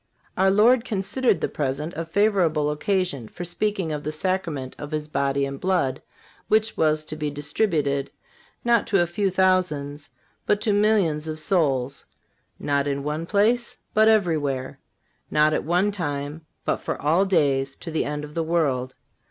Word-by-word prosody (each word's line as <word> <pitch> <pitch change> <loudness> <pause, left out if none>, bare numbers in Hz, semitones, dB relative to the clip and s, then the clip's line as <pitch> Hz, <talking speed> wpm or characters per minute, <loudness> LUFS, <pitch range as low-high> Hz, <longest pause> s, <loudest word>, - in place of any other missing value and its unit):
Our 190 +1 +3
Lord 225 +5 +5
considered 215 +1 0
the - - +1
present 150 +3 -3
a 165 - -3
favorable 170 -5 +2
occasion 150 - -1
for 175 - -8
speaking 190 -1 -1
of 150 -1 -4
the 155 - -2
Sacrament 155 -5 -2
of 145 - -6
His 150 -1 -3
body 140 -1 0
and 140 0 -6
blood, 165 -8 0 0.5
which 220 +1 +2
was 155 -1 +2
to 155 - -5
be 150 -1 -2
distributed, 145 -2 0 0.6
not 235 -2 +3
to 195 - +3
a - - 0
few 190 +4 -1
thousands, 175 -6 0 0.4
but 205 - +3
to 215 -1 +1
millions 200 -8 +2
of 155 0 -4
souls; 140 -6 0 0.5
not 140 -1 0
in 140 -1 -2
one 150 +3 -3
place, 220 +5 +1 0.2
but 215 +1 +5
everywhere; 155 -11 +1 0.5
not 150 0 +3
at - - 0
one 180 +5 +2
time, 150 -4 -4 0.2
but - - +1
for - - -4
all 160 +6 +3
days, 140 -8 +1
to 165 - -8
the 160 - 0
end 150 0 -4
of 150 0 -9
the 165 - -1
world. 140 -6 0
155 Hz, 165 wpm, -24 LUFS, 145-195 Hz, 0.6 s, Lord